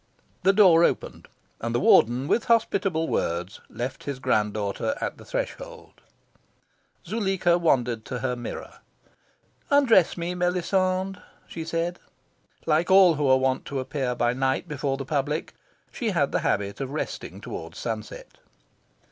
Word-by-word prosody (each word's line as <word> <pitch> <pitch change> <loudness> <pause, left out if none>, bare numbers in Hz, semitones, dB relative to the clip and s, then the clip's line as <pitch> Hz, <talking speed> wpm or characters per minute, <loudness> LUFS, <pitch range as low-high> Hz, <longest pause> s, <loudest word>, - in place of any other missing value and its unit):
The 195 - +5
door 185 -5 +6
opened, - - -1 0.3
and 115 +1 -3
the - - +2
Warden, 120 +3 +4
with 235 - +1
hospitable 195 -8 +1
words, 85 +3 -2
left 125 +2 -5
his 140 -2 -3
grand 110 -5 0
daughter 105 - -2
at - - -4
the - - -13
threshold. - - -6 1.0
Zuleika 190 -5 +1
wandered 125 -8 +1
to 125 - -4
her 125 0 -2
mirror. 120 -1 -8 0.9
"Undress 250 - +4
me, 170 +1 -3
Melisande," 185 +1 0 0.3
she 165 - -6
said. 165 +2 -2 0.7
Like 160 +4 +2
all 190 -2 +7
who 145 -2 0
are 130 0 +6
wont 130 0 0
to 140 - -3
appear 130 -1 -2
by 120 0 +1
night 130 +5 -1
before 140 -2 -2
the 135 - -5
public, 150 +2 -2 0.4
she - - -2
had - - +1
the - - +1
habit 100 +5 -1
of 135 - -3
resting 150 +3 -5
towards - - -8
sunset. - - -6
155 Hz, 145 wpm, -25 LUFS, 130-185 Hz, 1.0 s, all